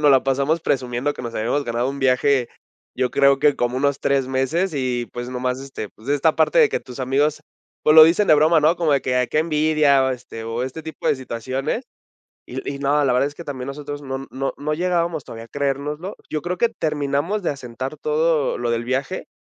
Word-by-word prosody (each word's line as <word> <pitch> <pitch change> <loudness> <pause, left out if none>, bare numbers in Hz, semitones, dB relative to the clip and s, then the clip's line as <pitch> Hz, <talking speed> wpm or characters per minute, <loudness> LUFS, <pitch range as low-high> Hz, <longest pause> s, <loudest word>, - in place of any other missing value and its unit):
nos 150 -1 +5
la 135 -1 +5
pasamos 140 +4 +1
presumiendo 125 +2 -1
que - - -9
nos 120 -1 -6
habíamos 120 +6 0
ganado 120 +1 -1
un 140 - -7
viaje, 130 -1 +2 0.5
yo 125 -1 0
creo 140 0 +4
que 145 0 +4
como 120 +1 -1
unos 140 +1 0
3 135 -2 +1
meses 140 +8 0
y, 125 -3 -1
pues, 120 0 -5
nomás, 125 +1 -2
este, 135 -6 -7
pues, 110 +5 -15
esta 145 +2 +2
parte - - +3
de 455 -3 +6
que - - -1
tus 125 +1 -10
amigos, 140 +4 +1 0.4
pues, 155 - +4
lo 160 - +11
dicen 175 +6 +3
de 155 - +8
broma, 155 +2 +4
¿no? 160 +4 +3
Como 165 -3 +1
de 140 - +2
que: 130 - -1
"Ay, 125 0 +2
qué 155 - +1
envidia", 155 -3 +3
o 130 - +1
este 120 -2 -7
o 115 +2 -3
este 130 +5 -5
tipo 160 0 -7
de - - +3
situaciones. 130 - -3 0.6
Y - - -6
y - - -8
no, 145 +1 +2
la 135 - +2
verdad 125 +3 +2
es 145 - -10
que 170 - -8
también 130 -4 -6
nosotros 145 +1 -6
no 135 -1 -5
no 135 +1 -3
no 150 +1 -2
llegábamos 170 -2 -1
todavía 115 0 -9
a - - -18
creérnoslo. 145 +6 -3
Yo 155 - -2
creo 180 +2 -3
que 235 +2 +2
terminamos 155 +2 -1
de - - 0
asentar 130 +1 -5
todo 155 -1 +1
lo 120 -1 -1
del 115 0 -1
viaje, 135 +9 -2
140 Hz, 225 wpm, -21 LUFS, 130-155 Hz, 0.6 s, lo